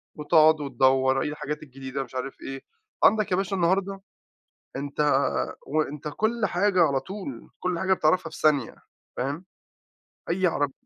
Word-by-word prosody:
وتقعد 155 0 +4
وتدوّر 130 0 +2
إيه - - -1
الحاجات 150 0 -5
الجديدة، 135 0 -6
مش 130 - -14
عارِف 130 +1 -5
إيه. 135 0 -6 0.4
عندك 215 -3 +4
يا - - +4
باشا 195 0 -1
النهارده، 195 +2 0 0.7
أنتَ 140 +2 -6 0.7
وأنتَ 150 0 -2
كل 220 +8 0
حاجة 185 0 +3
على 140 -4 +2
طول، 140 - -8
كل 180 -2 -1
حاجة 190 +1 +2
بتعرِفها 165 0 +1
في - - -9
ثانية، 145 -6 +2 0.4
فاهم؟ 145 +8 -3 0.9
أي 185 +2 +2
عرب 145 -5 0
155 Hz, 145 wpm, -26 LUFS, 135-185 Hz, 0.9 s, وتقعد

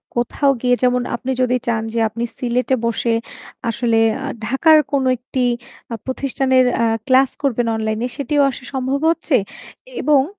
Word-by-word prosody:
কোথাও 260 +4 +1
গিয়ে 245 -1 +3
যেমন 250 0 +3
আপনি 260 +2 -4
যদি 250 0 +2
চান 225 -2 +1
যে 230 - 0
আপনি 230 +2 -5 0.2
সিলেটে 250 +1 0
বসে 230 0 0 0.6
আসলে 230 0 0 0.3
আ - - -4 0.2
ঢাকার 310 +6 +5
কোনো 275 -2 +1
একটি 250 +1 -3 0.5
আ - - -1
প্রতিষ্ঠানের 260 -1 +1
অ্যা 230 - +2 0.2
ক্লাস 260 0 +5
করবেন 245 -4 0
অনলাইনে, 220 +1 -2
সেটিও 285 +1 +1
আসলে 255 - -6 0.2
সম্ভব 265 +1 -1
হচ্ছে। 330 -3 +1 0.7
এবং 285 -3 +4
255 Hz, 150 wpm, -19 LUFS, 235-270 Hz, 0.7 s, ঢাকার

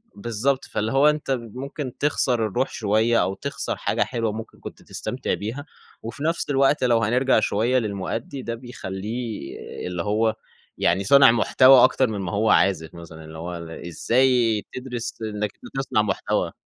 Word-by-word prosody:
بالضبط 120 +6 -1
فاللي 110 +1 -2
هو 140 +3 +5
أنت 150 -2 -2
ممكن 130 +2 -5
تخسر 125 -5 +1
الروح 125 +6 -1
شوية 110 +2 +2
أو 95 - -1
تخسر - - -4
حاجة - - -1
حلوة 115 -3 -2
ممكن 110 +1 -8
كنت - - -10
تستمتع - - -4
بيها، 120 +8 -4 0.4
وفي 115 +5 -6
نفس 165 0 -1
الوقت 135 0 +3
لو 120 -2 +3
هنرجع 125 +4 +3
شوية 115 +5 +1
للمؤدي 110 +5 -4
ده 115 -2 -4
بيخلّيه 115 - -6 0.3
اللي 90 -1 -3
هو 110 +2 +1 0.4
يعني 90 +3 +1
صانع 140 +4 +7
محتوى 130 +2 +6
أكتر 130 0 +4
من 110 -3 -4
ما 90 -3 -4
هو 110 +4 +1
عازف 80 -5 +2
مثلًا، 85 -2 -11
اللي 80 0 -10
هو 85 +2 -5 0.3
إزاي 115 +3 +2
تدرس 125 -2 -5
إنك 105 -2 -3 0.2
تصنع 135 -5 +1
محتوى. 100 -3 -1
115 Hz, 155 wpm, -23 LUFS, 105-130 Hz, 0.4 s, صانع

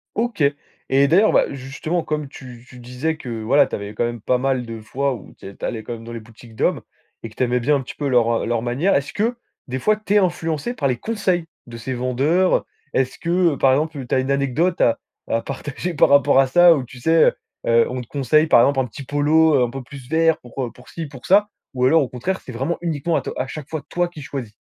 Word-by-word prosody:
OK. 230 -7 -1 0.5
Et 135 +1 +4
d'ailleurs, 190 +9 +4
ben, - - +3
justement, 145 +6 -3
comme 150 -2 -3
tu 125 -3 -12
tu 125 - -13
disais 125 +6 -3
que, 120 -7 -6
voilà, 135 +7 +4
tu - - -5
avais 100 +1 -6
quand 120 - 0
même 120 -2 -4
pas 125 - +1
mal 130 -1 -1
de 115 -1 -7
fois 135 +5 -1
où - - -13
t'é 95 0 -11
tu - - -6
allais 115 -3 -3
quand 120 - -5
même 115 -1 -9
dans 115 - -9
les 115 - -5
boutiques 115 +1 -16
d'hommes, - - 0 0.4
et 115 - -5
que 110 - -19
tu - - 0
aimais 125 0 +1
bien 145 +5 +2
un 140 - 0
petit 130 - -9
peu 145 - -3
leur, 120 -3 +3
heu, - - -2
leur 115 -1 0
manière, 130 +11 +1
est-ce 140 +1 -1
que, 230 +4 0 0.3
des 130 +1 -3
fois, 215 +9 +2
tu 210 -1 -3
es - - +6
influencé 170 - 0
par 140 - 0
les 125 -2 0
conseils 195 - -1 0.2
de 120 -1 -9
ces 125 +3 -4
vendeurs, 135 +9 +1
heu? - - -6 0.3
Est-ce 130 -1 0
que, 170 -1 +2
heu, - - -5
par 135 - +4
exemple, 145 -1 -1
tu 120 - -1
as - - +3
une 130 +1 -1
anecdote 140 +6 0
à 115 - +3 0.3
à 115 - +1
partager 145 +7 -5
par 150 - +4
rapport 140 -1 +5
à 135 -1 +5
ça 175 +4 +6
ou 135 - -2
tu 125 0 -12
sais, 160 +4 +4
heu, - - +3 0.3
heu, 115 0 +4
on 125 0 -4
te 120 - -11
conseille 150 +4 +2
par - - +6
exemple 135 +2 +3
un 130 - -1
petit 125 +4 -9
polo, 150 +3 +3
heu, 130 - +4
un 120 - 0
peu 135 +2 -6
plus 130 0 -12
vert 160 0 +3
pour, 125 +2 -7
heu, - - -6
pour 125 - -17
ci, 165 - -5
pour 135 -4 -12
ça, 205 +2 +4 0.3
ou 125 0 +1
alors 160 +4 +5
au 135 - -2
contraire 180 +10 -3
c'est - - -10
vraiment 135 +8 -2
uniquement 165 -1 -1
à 140 - +1
to - - -5
à 130 - -2
chaque 155 +1 -8
fois 160 -2 -4
toi 175 0 0
qui 155 -4 -11
choisis? 130 -6 -6
135 Hz, 270 wpm, -21 LUFS, 125-160 Hz, 0.5 s, es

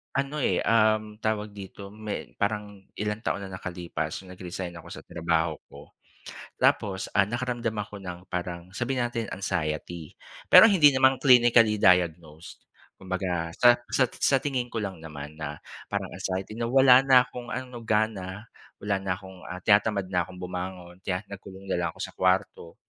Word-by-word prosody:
Ano, 140 +2 -1
eh, - - +1
uhm, 110 -1 +2
tawag 105 -1 -2
dito 100 0 -10
may 110 0 -6
parang 105 -1 -2 0.2
ilang 105 +1 -2
taon 100 -3 -2
na 95 - -8
nakalipas 85 -1 -5
nung 90 - -12
nag-resign 90 -1 -6
ako - - -13
sa - - -9
trabaho 80 -1 -1
ko 70 +1 -14 0.7
tapos, 95 -2 +1
ah, 100 - +6
nakaramdam 120 +1 -2
ako 105 -1 -5
ng 90 -1 -6
parang 90 -1 -5
sabihin 125 +1 -1
natin 115 -1 -3
anxiety 85 -3 -3 0.4
pero 225 - +11
hindi 160 -8 +6
naman 130 0 +4
clinically 120 -5 +5
diagnosed. 85 -4 +1 0.4
Kumbaga 90 -3 -3
sa 120 0 +7 0.2
sat 130 -3 +1
sa 135 - +4
tingin 130 -3 -2
ko 115 -3 -3
lang 95 -4 -6
naman 75 -2 -8
na 75 0 -4 0.3
parang - - -3
anxiety 95 +2 -4
na, 115 +1 -3
wala 130 0 +7
na 130 -2 +6
akong 125 -1 -9
ano 125 -1 -6
gana, 105 -3 -1 0.3
wala 100 -1 -2
na 95 -1 -2
akong, 95 0 -12
ah, 90 +1 -6
tinatamad 100 -2 +2
na 90 -1 0
akong 95 - -11
bumangon 90 0 -7
kaya 95 +1 -3
nagkulong 95 -1 -11
na 95 -2 -1
lang 85 - 0
ako - - -13
sa - - -8
kwarto. 95 -2 0
100 Hz, 165 wpm, -27 LUFS, 90-115 Hz, 0.7 s, pero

